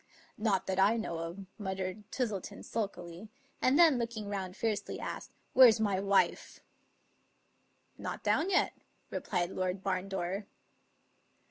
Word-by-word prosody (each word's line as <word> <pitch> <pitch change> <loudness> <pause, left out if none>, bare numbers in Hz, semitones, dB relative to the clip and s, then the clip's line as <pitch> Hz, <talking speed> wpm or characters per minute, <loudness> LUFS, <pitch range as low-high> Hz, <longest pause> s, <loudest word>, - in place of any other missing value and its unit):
" - - -25
" - - -32
Not 210 -3 +1
that 190 0 -1
I 205 +4 +5
know 170 -7 -3
of," 170 +4 -6
muttered 190 +1 -4
Twistleton 215 -8 -3
sulkily; 195 -3 -4 0.3
and 260 +3 +4
then, 325 -7 +6
looking 230 -3 -3
round 190 -1 -4
fiercely, 215 -3 -2
asked, - - -5 0.2
"Where's 240 -4 +8
my 200 -3 +1
wife?" 200 0 +1 0.7
" - - -41
Not - - -5
down 350 - +2
yet," 375 - +3 0.4
replied 180 -2 -1
Lord 185 +1 -2
Barndore. 190 +1 -2
200 Hz, 135 wpm, -32 LUFS, 185-220 Hz, 0.7 s, Where's